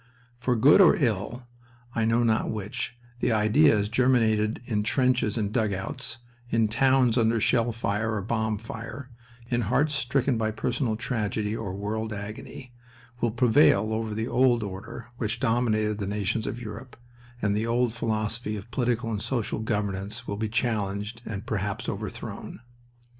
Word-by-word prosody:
For 125 0 +1
good 140 - +7
or 180 - +7
ill, 120 - -1 0.5
I 115 - +1
know 115 +1 +3
not 110 -1 +2
which, 110 +3 -4 0.2
the - - +1
ideas 105 -2 +4
germinated 110 -3 +2
in 105 -4 0
trenches 125 -1 +1
and 105 -2 -1
dugouts, 110 +4 -2 0.3
in 115 -2 +2
towns 125 +1 +3
under 115 0 +3
shell 120 +2 +2
fire 110 0 -1
or 100 - -2
bomb 110 0 -1
fire, 115 +4 -8 0.4
in 120 0 +2
hearts 135 +8 +1
stricken 130 -2 +1
by 110 -1 +1
personal 115 +2 -1
tragedy 110 -2 -2
or 100 -5 -4
world 110 +2 -3
agony, 105 +4 -8 0.5
will 120 - +1
prevail 115 -2 +4
over 110 -1 -2
the 110 +1 -2
old 125 -3 +3
order 105 +4 -7
which 115 0 -2
dominated 110 -4 +1
the 100 - -2
nations 105 +2 -1
of 120 - -4
Europe, 120 +2 -8 0.4
and 100 -3 +1
the 110 +2 0
old 120 0 +1
philosophy 110 -1 -2
of 105 +4 -10
political 120 -2 0
and 105 -2 -2
social 120 -5 -1
governance 105 +1 -2
will 100 - -2
be 110 +1 -2
challenged 110 -1 -1
and 105 -2 -5
perhaps 100 -2 -2
overthrown. - - -6
110 Hz, 155 wpm, -27 LUFS, 105-120 Hz, 0.5 s, good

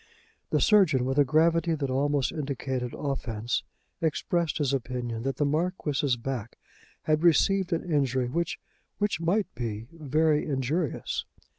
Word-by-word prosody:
The - - +2
surgeon, 170 - +4
with 135 +2 0
a - - +8
gravity 165 +3 +3
that 140 -3 -2
almost 140 0 +1
indicated 130 -4 -3
offence, 120 -5 -2 0.4
expressed 165 +1 0
his 140 -3 0
opinion 120 -3 -3
that 135 +1 -2
the 145 - +1
Marquis's 150 -4 0
back 120 -2 -5 0.5
had 155 0 +2
received 180 +2 +3
an 165 - 0
injury 135 -7 +1
which 170 +6 -2 0.4
which 205 -4 0
might 190 +5 +1
be 115 -3 -4
very 155 -1 +1
injurious. 140 +2 -1
145 Hz, 135 wpm, -28 LUFS, 130-165 Hz, 0.5 s, a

